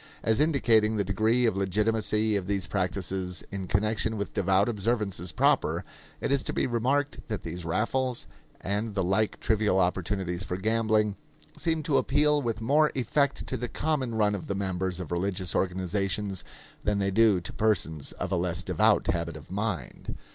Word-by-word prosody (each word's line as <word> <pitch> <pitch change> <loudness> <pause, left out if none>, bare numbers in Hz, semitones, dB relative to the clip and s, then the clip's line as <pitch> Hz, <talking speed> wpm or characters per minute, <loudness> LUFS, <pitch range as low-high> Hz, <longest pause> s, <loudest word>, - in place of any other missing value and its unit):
As 110 -1 +2
indicating 115 -8 +3
the 100 - +2
degree 110 +6 +2
of 110 - +2
legitimacy 105 +2 +1
of 95 -2 -2
these 100 -2 0
practices 95 -1 -2
in 95 -2 -4
connection 110 +3 0
with 100 - -4
devout 95 +1 +2
observances 105 -5 -1
proper, 75 - +2 0.4
it - - -2
is 140 -1 +3
to - - -3
be - - +1
remarked 130 +4 0
that 110 -3 -4
these 85 +1 -6
raffles, 120 +8 0 0.3
and 105 +2 -2
the 95 - +1
like 100 +4 +1
trivial 110 -3 +1
opportunities 90 0 -1
for 90 - -3
gambling, 110 0 +1 0.4
seem 160 -2 -1
to 145 -2 +2
appeal 150 +1 +2
with 115 -3 -2
more 150 +6 +3
effect 140 +3 0
to - - -3
the 120 0 -4
common 135 -6 -1
run 105 -1 +2
of 100 - -5
the 100 - -2
members 95 -2 -1
of 90 -3 -6
religious 90 0 -1
organizations 95 +1 -1 0.4
than 105 -1 +1
they 100 -1 0
do 105 -2 +4
to 90 - -6
persons 80 -9 +1
of - - -5
a - - +2
less - - -1
devout - - +3
habit 85 -1 -1
of 75 +2 -14
mind. 95 - -4
105 Hz, 170 wpm, -28 LUFS, 95-115 Hz, 0.4 s, do